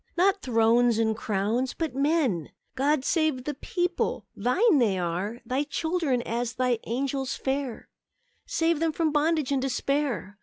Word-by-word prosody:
Not 390 +2 +3
thrones 230 -1 +3
and 220 -1 +1
crowns, 220 +4 -1
but 320 -5 -2
men! 275 - +1 0.2
God 275 +1 +1
save 310 -7 +1
the 295 - -3
people! 355 +5 -2
Thine 290 - +3
they 210 -6 +2
are; 185 +7 -3
Thy 255 +4 0
children, 310 -4 -1
as 235 +1 -2
Thy 250 -2 +1
angels 265 +2 -2
fair; 265 -3 -3 0.6
Save 330 -1 +1
them 325 -1 +1
from 320 -1 +1
bondage 300 -1 +1
and 275 -2 +1
despair! 265 -5 -1
265 Hz, 145 wpm, -27 LUFS, 235-310 Hz, 0.6 s, Not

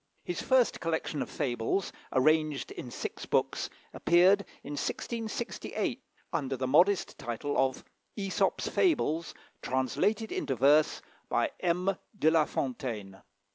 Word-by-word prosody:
His 175 - -3
first 260 -2 +3
collection 160 -2 -2
of - - -3
fables, 130 +6 -1 0.2
arranged 155 +1 +2
in 125 - -7
six - - -6
books, - - 0 0.2
appeared 185 +4 +4 0.2
in - - -7
1668, 230 - -3 0.3
under 135 -2 -1
the 130 - -1
modest 175 +9 +3
title 120 +5 -3
of 130 -1 +1 0.3
"Æsop's 195 -2 0
Fables: 170 - +1 0.3
Translated 205 - 0
into 135 - -1
Verse 145 +4 +4 0.3
by - - +1
M. 180 +2 +1 0.2
de 160 -5 +4
la 160 -2 +4
Fontaine." 110 -9 -4
155 Hz, 120 wpm, -30 LUFS, 130-190 Hz, 0.3 s, appeared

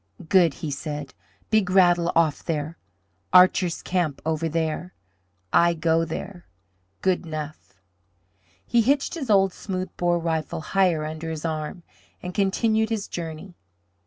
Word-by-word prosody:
"Good!" 175 -6 +4
he 150 - -2
said. 150 +1 -5 0.4
"Big 215 -4 +3
Rattle 175 -2 +4
off 160 -3 +2
there, 155 0 -3 0.5
Archer's 180 -1 +5
camp 175 -6 -1
over 160 0 0
there. 165 +3 -2 0.6
I 170 0 +4
go 165 0 +2
there. 175 +2 -7 0.6
Good 185 -1 +2
'nough!" 155 - -7 0.9
He 235 - +3
hitched 275 +5 +1
his 290 -8 -5
old 195 -2 +4
smooth 185 -2 -5
bore 175 -1 +2
rifle 160 -2 -2
higher 175 -3 +1
under 160 +1 -5
his 160 0 -5
arm 155 +2 -4 0.4
and 180 0 -5
continued 220 +3 +1
his 220 -3 -2
journey. 165 +2 -6
170 Hz, 130 wpm, -24 LUFS, 160-190 Hz, 0.9 s, Archer's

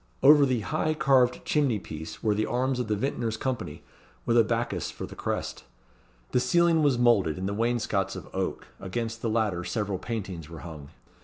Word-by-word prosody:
Over 145 0 +8
the 125 -3 0
high 155 +10 -1
carved 135 -5 +3
chimney 140 -7 +2
piece 80 -4 -8
were 110 -2 +3
the 105 +1 0
arms 125 +2 0
of 125 - -1
the 105 - +1
Vintners' 115 -1 -2
Company, 125 - -4 0.4
with 115 - +2
a 115 - +7
Bacchus 115 -6 -1
for - - -6
the - - -10
crest. - - -3 0.7
The - - +3
ceiling 170 +3 +3
was 140 -4 +3
moulded, 115 -10 +3
and 95 +1 -2
the 100 - -2
wainscots 110 -3 0
of - - -8
oak; - - -2
against 115 +4 -4
the 115 - -1
latter 105 -6 0
several 100 0 -2
paintings 95 -9 -5
were 80 -2 -9
hung. 75 -5 -9
115 Hz, 185 wpm, -27 LUFS, 95-125 Hz, 0.7 s, Over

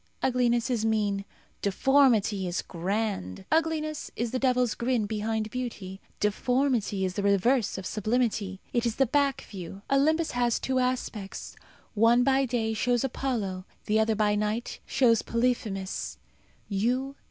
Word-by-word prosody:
Ugliness 245 -1 +2
is 230 -3 0
mean, 205 -3 0 0.4
deformity 215 -3 +3
is 175 0 -2
grand. 190 - -3
Ugliness 310 -1 0
is 235 -1 -2
the 255 - -1
devil's 250 -3 +2
grin 235 -2 0
behind 215 +1 -2
beauty; 205 -7 -5 0.2
deformity 225 -2 +1
is 185 - -2
the 200 - -2
reverse 200 +4 +2
of 190 - -6
sublimity. 215 -3 -1
It 240 -1 +1
is 230 - -2
the 270 - +3
back 280 +1 +1
view. 195 0 -9
Olympus 310 +4 +3
has 240 -1 +1
two 260 -1 0
aspects. 250 -6 -3 0.4
One, 230 +3 +4
by 270 +1 +3
day, 230 -3 -1
shows 240 +3 +1
Apollo; 225 -8 -2 0.2
the 215 +1 +2
other, 220 0 +2
by 210 -1 +2
night, 210 +3 -2
shows 230 -4 +3
Polyphemus. 230 -5 -2
225 Hz, 135 wpm, -28 LUFS, 205-255 Hz, 0.4 s, One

